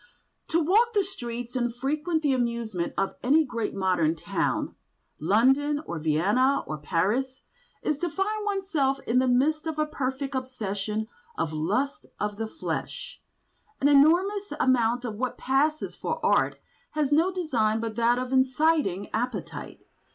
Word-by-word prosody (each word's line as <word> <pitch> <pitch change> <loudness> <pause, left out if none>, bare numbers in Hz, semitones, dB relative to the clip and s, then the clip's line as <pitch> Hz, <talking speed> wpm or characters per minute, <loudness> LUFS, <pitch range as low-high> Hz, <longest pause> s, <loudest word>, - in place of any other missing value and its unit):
To 335 - +2
walk 430 +9 +3
the 405 - +4
streets 245 -9 -6
and 240 -2 -1
frequent 305 +5 -1
the 285 -2 +3
amusements 235 -7 -2
of 195 - 0
any 300 +5 +4
great 235 -6 -3
modern 180 -5 +2
town—London 230 - 0
or 170 - -4
Vienna 200 - +2
or 155 -1 -5
Paris—is 260 - -2
to 350 - -1
find 420 +5 -1
oneself 375 -10 0
in 240 +2 +2
the 260 - +2
midst 300 +6 +2
of 320 -1 -3
a 305 - +2
perfect 275 -2 -3
obsession 220 -5 -3 0.3
of 155 - -1
the 155 - -4
lusts 230 - -1
of 210 0 -2
the 225 0 -2
flesh. 320 - -5 0.6
An 280 - +3
enormous 355 +9 +4
amount 245 -1 +2
of 215 -3 -4
what 255 +2 -2
passes 295 +4 0
for - - -3
art - - +2 0.4
has 295 -2 +1
no 325 +5 +4
design 240 -12 0
but 225 -1 -4
that 235 +1 +3
of 255 +1 -3
inciting 260 - +2
appetite. 245 +3 -4
255 Hz, 145 wpm, -27 LUFS, 220-305 Hz, 0.6 s, the